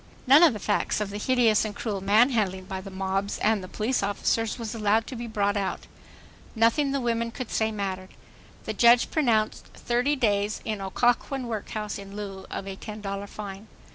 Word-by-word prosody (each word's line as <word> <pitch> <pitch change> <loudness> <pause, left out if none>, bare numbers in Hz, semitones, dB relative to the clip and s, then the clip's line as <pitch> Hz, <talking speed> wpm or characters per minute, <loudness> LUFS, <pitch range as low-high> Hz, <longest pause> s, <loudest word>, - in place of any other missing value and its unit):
None 275 +4 +7
of 335 -7 +7
the - - -4
facts 205 +1 0
of 210 -1 -3
the 205 - -5
hideous 235 -2 +3
and 210 -2 -4
cruel 205 -4 -3
manhandling 205 -2 +2
by 190 0 -5
the 195 - -9
mobs 195 +1 -2
and 205 -4 0
police 230 +4 0
officers 205 +2 0
was 230 -2 -5
allowed 220 0 +2
to 260 - -7
be 235 0 -5
brought 205 -2 0
out. 200 -2 -2 0.7
Nothing 230 +6 +3
the 275 - 0
women 230 -2 0
could 240 0 -7
say 220 0 +1
mattered. 190 -3 -4 0.6
The - - -2
judge 240 0 +5
pronounced: 230 -8 +1
"Thirty 245 +5 0
days 210 -4 +1
in 215 -2 -3
Occoquan 245 +6 0
workhouse 215 -2 -4
in 195 0 -10
lieu 195 -2 -7
of 195 - -5
a 195 - -5
$10.00 200 -1 -6
fine." 200 0 -8
215 Hz, 180 wpm, -26 LUFS, 200-235 Hz, 0.7 s, None